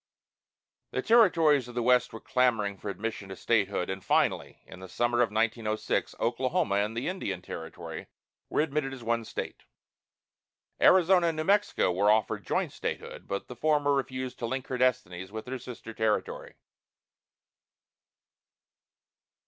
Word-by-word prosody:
The -, -, -3 dB
territories 165 Hz, -, +4 dB
of 120 Hz, -, -11 dB
the 120 Hz, -, 0 dB
West 125 Hz, +1 st, +3 dB
were 110 Hz, -, -8 dB
clamoring 110 Hz, -7 st, +1 dB
for 105 Hz, -, -5 dB
admission 100 Hz, 0 st, -5 dB
to 95 Hz, -, -6 dB
statehood, 100 Hz, -4 st, 0 dB
and 95 Hz, 0 st, -5 dB
finally, -, -, 0 dB
in 95 Hz, -, -12 dB
the 95 Hz, 0 st, -10 dB
summer 120 Hz, 0 st, 0 dB
of 120 Hz, -, +3 dB
1906, 110 Hz, 0 st, -1 dB
Oklahoma 130 Hz, -, 0 dB
and 105 Hz, +3 st, -1 dB
the 120 Hz, -, -2 dB
Indian 175 Hz, -, -3 dB
Territory 80 Hz, -1 st, -7 dB, 0.4 s
were -, -, +1 dB
admitted 145 Hz, -3 st, -1 dB
as 125 Hz, -, -11 dB
one 115 Hz, 0 st, 0 dB
state. -, -, -6 dB, 1.2 s
Arizona 180 Hz, -1 st, +5 dB
and 165 Hz, -1 st, -1 dB
New 155 Hz, -, -1 dB
Mexico 200 Hz, -, +2 dB
were 100 Hz, +4 st, +2 dB
offered 110 Hz, +1 st, +1 dB
joint -, -, -1 dB
statehood, -, -, -5 dB
but 100 Hz, -, -4 dB
the 125 Hz, -, -8 dB
former 145 Hz, +2 st, +2 dB
refused 130 Hz, -2 st, -3 dB
to 115 Hz, -, -2 dB
link 130 Hz, +2 st, -3 dB
her 130 Hz, -, -2 dB
destinies 95 Hz, -7 st, 0 dB
with 110 Hz, 0 st, -6 dB
her 130 Hz, +1 st, -5 dB
sister 115 Hz, -2 st, -9 dB
territory. 110 Hz, -1 st, -2 dB
120 Hz, 150 wpm, -28 LUFS, 105-135 Hz, 1.2 s, Arizona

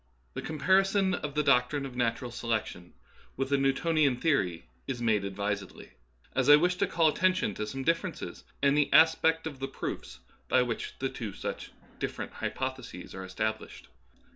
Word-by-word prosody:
The -, -, -4 dB
comparison 190 Hz, +5 st, +2 dB
of 150 Hz, -4 st, -4 dB
the 150 Hz, -, +2 dB
doctrine 140 Hz, +2 st, +2 dB
of 130 Hz, -2 st, -8 dB
natural 120 Hz, 0 st, -1 dB
selec 115 Hz, -2 st, -1 dB
tion 90 Hz, -1 st, -11 dB, 0.4 s
with 135 Hz, 0 st, -1 dB
the 140 Hz, -, +3 dB
Newtonian 140 Hz, 0 st, +2 dB
theory 100 Hz, -, 0 dB, 0.2 s
is 130 Hz, -3 st, -3 dB
made 110 Hz, -4 st, +2 dB
advisedly, 100 Hz, +1 st, -4 dB, 0.4 s
as 130 Hz, +1 st, +1 dB
I 145 Hz, -, +11 dB
wish 175 Hz, +4 st, +3 dB
to -, -, +1 dB
call 165 Hz, -1 st, +3 dB
attention 185 Hz, -, +2 dB
to 105 Hz, +2 st, -4 dB
some 135 Hz, +4 st, -5 dB
differences 165 Hz, +3 st, -2 dB, 0.2 s
in 140 Hz, 0 st, +5 dB
the 150 Hz, -1 st, +2 dB
aspect 160 Hz, 0 st, +5 dB
of 145 Hz, -4 st, -6 dB
the 135 Hz, -, -2 dB
proofs 65 Hz, -, -6 dB, 0.3 s
by -, -, +4 dB
which 120 Hz, -2 st, -4 dB
two 120 Hz, -6 st, -4 dB
such -, -, -5 dB, 0.3 s
differ -, -, -3 dB
ent -, -, -10 dB
hypotheses -, -, -5 dB
are 95 Hz, -, -6 dB
established. 110 Hz, +4 st, -4 dB
135 Hz, 165 wpm, -29 LUFS, 110-160 Hz, 0.4 s, I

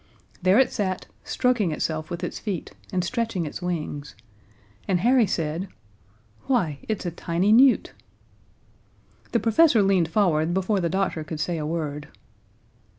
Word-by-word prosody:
There 185 Hz, +3 st, +4 dB
it 265 Hz, -, +4 dB
sat, 185 Hz, -3 st, -2 dB, 0.2 s
stroking 245 Hz, -9 st, +1 dB
itself 155 Hz, 0 st, -2 dB
with 175 Hz, +1 st, -5 dB
its 175 Hz, -, -4 dB
feet 195 Hz, -7 st, -4 dB, 0.2 s
and 180 Hz, -1 st, 0 dB
stretching 225 Hz, -4 st, -2 dB
its 150 Hz, -, -6 dB
wings, 155 Hz, -5 st, -4 dB, 0.7 s
and 180 Hz, -3 st, +1 dB
Harry 240 Hz, 0 st, +4 dB
said: 165 Hz, +2 st, -2 dB, 0.8 s
"Why, 175 Hz, -, +1 dB
it's 215 Hz, -3 st, -2 dB
a 175 Hz, -, -1 dB
tiny 175 Hz, +4 st, 0 dB
newt!" 255 Hz, +3 st, +5 dB, 1.4 s
The 235 Hz, -, +2 dB
professor 230 Hz, +1 st, +4 dB
leaned 190 Hz, -4 st, +3 dB
forward 170 Hz, -3 st, +1 dB
before 190 Hz, +2 st, +1 dB
the 170 Hz, -2 st, 0 dB
doctor 190 Hz, -3 st, -1 dB
could 155 Hz, 0 st, -6 dB
say 165 Hz, +1 st, -1 dB
a 150 Hz, -, -3 dB
word. 150 Hz, -2 st, -3 dB
180 Hz, 145 wpm, -25 LUFS, 160-215 Hz, 1.4 s, newt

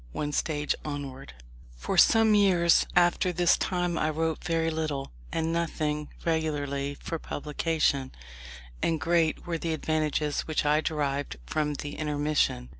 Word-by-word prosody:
ONE 150 Hz, 0 st, -2 dB
STAGE 150 Hz, 0 st, 0 dB
ONWARD 140 Hz, -, -6 dB, 0.4 s
For -, -, -3 dB
some 225 Hz, -1 st, +6 dB
years 185 Hz, -5 st, +4 dB
after 175 Hz, +1 st, +3 dB
this 175 Hz, 0 st, +3 dB
time 175 Hz, -2 st, -1 dB
I 155 Hz, -, +1 dB
wrote 160 Hz, +1 st, -1 dB
very 165 Hz, -1 st, 0 dB
little, 155 Hz, -4 st, -3 dB, 0.2 s
and 165 Hz, 0 st, -1 dB
nothing 155 Hz, -3 st, -1 dB, 0.2 s
regularly, 145 Hz, -4 st, -1 dB
for 165 Hz, -, -4 dB
publication: 150 Hz, -3 st, -1 dB, 0.7 s
and 165 Hz, -1 st, +1 dB
great 165 Hz, 0 st, +1 dB
were 170 Hz, -2 st, -2 dB
the 165 Hz, 0 st, -2 dB
advantages 155 Hz, -1 st, -1 dB
which 155 Hz, -1 st, 0 dB
I 150 Hz, +1 st, +3 dB
derived 145 Hz, -, -2 dB
from 150 Hz, -, -1 dB
the 145 Hz, +1 st, -6 dB
intermission. 150 Hz, -, 0 dB
155 Hz, 135 wpm, -28 LUFS, 145-165 Hz, 0.7 s, some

